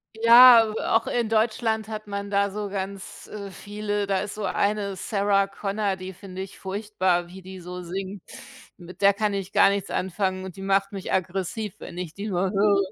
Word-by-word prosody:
Ja, 230 Hz, 0 st, +8 dB, 0.2 s
auch 225 Hz, -, +3 dB
in 235 Hz, -2 st, -1 dB
Deutschland 220 Hz, 0 st, +1 dB
hat 215 Hz, -1 st, -6 dB
man 200 Hz, 0 st, -5 dB
da 200 Hz, 0 st, +2 dB
so 205 Hz, +1 st, -4 dB
ganz, 195 Hz, 0 st, -6 dB
äh, 200 Hz, -2 st, -7 dB
viele. 205 Hz, +1 st, -3 dB
Da 195 Hz, -1 st, +1 dB
ist 205 Hz, 0 st, -5 dB
so 210 Hz, -1 st, -5 dB
eine 200 Hz, +1 st, 0 dB
Sarah 200 Hz, 0 st, +1 dB
Connor, 195 Hz, 0 st, -2 dB
die 185 Hz, 0 st, -7 dB
finde 190 Hz, 0 st, -8 dB
ich 190 Hz, -, -10 dB
furchtbar, 190 Hz, -3 st, -1 dB
wie 190 Hz, +2 st, -11 dB
die 190 Hz, 0 st, -10 dB
so 180 Hz, +1 st, -7 dB
singt. 190 Hz, +2 st, -6 dB, 0.5 s
Mit 180 Hz, -1 st, -13 dB
der 200 Hz, 0 st, +5 dB
kann 210 Hz, 0 st, 0 dB
ich 195 Hz, -1 st, -4 dB
gar -, -, +6 dB
nichts 200 Hz, -1 st, -2 dB
anfangen 185 Hz, 0 st, -2 dB
und 190 Hz, -1 st, -8 dB
die 195 Hz, -, -8 dB
macht 195 Hz, +1 st, +1 dB
mich 195 Hz, -2 st, -5 dB
aggressiv, 190 Hz, +3 st, -2 dB
wenn 170 Hz, -, -9 dB
ich 175 Hz, -3 st, -5 dB
die 200 Hz, +4 st, -6 dB
nur 185 Hz, -1 st, 0 dB
höre. 200 Hz, 0 st, +3 dB
200 Hz, 195 wpm, -25 LUFS, 190-210 Hz, 0.5 s, Ja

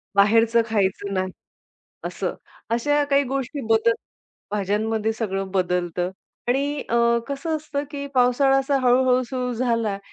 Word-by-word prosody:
बाहेरचं 225 Hz, +3 st, +5 dB
खायचं 200 Hz, -1 st, 0 dB
नाही 185 Hz, 0 st, -1 dB, 0.7 s
असं. -, -, -3 dB, 0.3 s
अशा 290 Hz, +6 st, +2 dB
काही 280 Hz, 0 st, +4 dB
गोष्टी 270 Hz, +2 st, -3 dB
बदल 225 Hz, +1 st, +4 dB, 0.6 s
भाज्यांमध्ये 215 Hz, +2 st, 0 dB
सगळं 195 Hz, -4 st, -3 dB
बदलतं 180 Hz, -1 st, 0 dB, 0.4 s
आणि 280 Hz, +3 st, 0 dB
अ, 235 Hz, -, +1 dB, 0.3 s
कसं 280 Hz, +3 st, -2 dB
असतं, 295 Hz, -2 st, -4 dB
की 280 Hz, -2 st, -5 dB
पावसाळा 255 Hz, +2 st, +4 dB
असा 275 Hz, +1 st, +1 dB
हळू-हळू 255 Hz, 0 st, +4 dB
सुरु 250 Hz, 0 st, -3 dB
झाला, 230 Hz, -4 st, 0 dB
235 Hz, 125 wpm, -23 LUFS, 205-270 Hz, 0.7 s, बाहेरचं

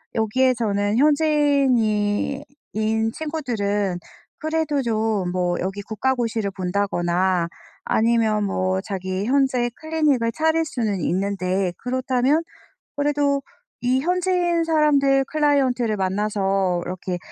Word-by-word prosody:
여기에 255 Hz, +4 st, +2 dB
저는 205 Hz, -2 st, 0 dB
현지인이 275 Hz, -7 st, +2 dB, 0.3 s
인 220 Hz, +1 st, 0 dB
친구들은 210 Hz, -, -2 dB, 0.4 s
그래도 315 Hz, -2 st, -1 dB
좀 220 Hz, -5 st, 0 dB
뭐 180 Hz, -1 st, 0 dB
여기 195 Hz, +2 st, -3 dB
국가고시를 225 Hz, -1 st, -1 dB
본다거나 185 Hz, -2 st, 0 dB, 0.4 s
아니면 220 Hz, -2 st, +2 dB
뭐 190 Hz, -1 st, 0 dB
자기 190 Hz, 0 st, -4 dB
현재 260 Hz, -1 st, +2 dB
클리닉을 300 Hz, -6 st, 0 dB
차릴 320 Hz, +1 st, +1 dB
수는 225 Hz, -9 st, -2 dB
있는데 190 Hz, 0 st, -1 dB
그렇다면 255 Hz, +4 st, 0 dB, 0.5 s
그래도 285 Hz, -1 st, +1 dB, 0.4 s
이 250 Hz, +2 st, +2 dB
현지인 355 Hz, 0 st, +1 dB
사람들 285 Hz, -4 st, +3 dB
클라이언트를 265 Hz, -7 st, +1 dB
만나서 195 Hz, -2 st, 0 dB
이렇게 180 Hz, 0 st, -4 dB
230 Hz, 260 characters per minute, -22 LUFS, 200-280 Hz, 0.5 s, 사람들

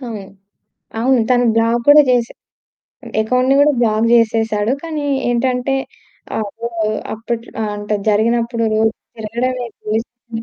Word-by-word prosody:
అవును. 230 Hz, -6 st, -6 dB, 0.8 s
అవును 255 Hz, 0 st, +3 dB
తను 245 Hz, -1 st, +4 dB
బ్లాక్ 230 Hz, +1 st, +2 dB
కూడా 295 Hz, +1 st, +9 dB
చేసి 240 Hz, -2 st, +1 dB, 0.9 s
అకౌంట్‌ని 255 Hz, +4 st, +2 dB
కూడా 295 Hz, +1 st, +5 dB
బ్లాక్ 220 Hz, -1 st, +2 dB
జేసేసాడు. 225 Hz, -1 st, +2 dB
కానీ 310 Hz, -3 st, -4 dB, 0.2 s
ఏంటంటే 250 Hz, +2 st, 0 dB, 0.6 s
ఆపో 220 Hz, +2 st, -5 dB, 0.5 s
అప్పట్లో 230 Hz, +1 st, -5 dB
ఆ! -, -, 0 dB
అంటే 205 Hz, +1 st, -3 dB
జరిగినప్పుడు 230 Hz, +2 st, +1 dB
రోజు 220 Hz, 0 st, +3 dB, 0.3 s
తిరగడమే. 240 Hz, +3 st, -3 dB, 0.2 s
రోజు 220 Hz, +1 st, 0 dB
తిరిగి 235 Hz, -1 st, -9 dB
235 Hz, 120 wpm, -17 LUFS, 220-250 Hz, 0.9 s, కూడా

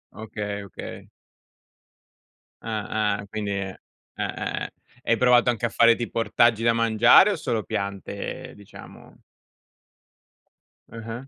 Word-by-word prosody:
Okay, 105 Hz, -2 st, -5 dB
okay. 100 Hz, -, -10 dB, 1.5 s
Ah, 105 Hz, -1 st, -1 dB
ah. 100 Hz, -, -9 dB
Quindi 105 Hz, 0 st, -4 dB
è 95 Hz, -1 st, -4 dB, 0.4 s
eh, -, -, -3 dB
eh, -, -, -4 dB
eh. -, -, -6 dB, 0.3 s
Hai 115 Hz, -, +2 dB
provato 125 Hz, 0 st, +4 dB
anche 120 Hz, 0 st, -3 dB
a -, -, -7 dB
fare 115 Hz, +1 st, +5 dB
tipo 115 Hz, 0 st, -4 dB
ortaggi 115 Hz, +1 st, +2 dB
da 115 Hz, 0 st, +4 dB
mangiare 115 Hz, -, +5 dB
o -, -, -1 dB
solo 115 Hz, -, -2 dB
piante, 100 Hz, -1 st, -5 dB
diciamo? 100 Hz, -1 st, -14 dB, 1.7 s
Ah-ah. 115 Hz, +3 st, -8 dB
110 Hz, 120 wpm, -24 LUFS, 105-115 Hz, 1.7 s, fare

